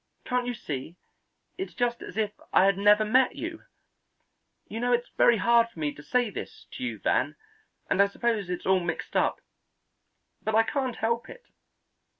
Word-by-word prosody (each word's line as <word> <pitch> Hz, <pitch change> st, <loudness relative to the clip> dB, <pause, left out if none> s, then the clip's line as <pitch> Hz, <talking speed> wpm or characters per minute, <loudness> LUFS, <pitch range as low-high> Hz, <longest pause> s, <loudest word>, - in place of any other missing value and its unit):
Can't 250 Hz, -1 st, 0 dB
you 245 Hz, -, -2 dB
see, 145 Hz, -2 st, -6 dB, 0.6 s
it's 380 Hz, -, -5 dB
just 240 Hz, -1 st, 0 dB
as 195 Hz, -, -9 dB
if 215 Hz, -2 st, +1 dB, 0.2 s
I 185 Hz, -, +5 dB
had 195 Hz, -1 st, +4 dB
never 205 Hz, +2 st, +5 dB
met 250 Hz, +4 st, +3 dB
you. 330 Hz, 0 st, -6 dB, 1.0 s
You 225 Hz, -, -5 dB
know 245 Hz, +1 st, 0 dB
it's 240 Hz, 0 st, 0 dB
very 235 Hz, -, +5 dB
hard 235 Hz, +3 st, +4 dB
for 230 Hz, -, -22 dB
me 150 Hz, -2 st, -1 dB
to -, -, -12 dB
say 245 Hz, +6 st, 0 dB
this -, -, -8 dB
to -, -, -7 dB
you, -, -, -3 dB
Van, -, -, 0 dB, 0.5 s
and 195 Hz, -, +3 dB
I 200 Hz, -, +5 dB
suppose 210 Hz, -2 st, -1 dB
it's 180 Hz, -, -4 dB
all 190 Hz, 0 st, +4 dB
mixed 175 Hz, -2 st, -4 dB
up, -, -, +1 dB, 1.0 s
but 220 Hz, -, -1 dB
I 225 Hz, -, +6 dB
can't 260 Hz, 0 st, -2 dB
help 230 Hz, +1 st, -1 dB
it. -, -, -11 dB
225 Hz, 180 wpm, -27 LUFS, 195-245 Hz, 1.0 s, I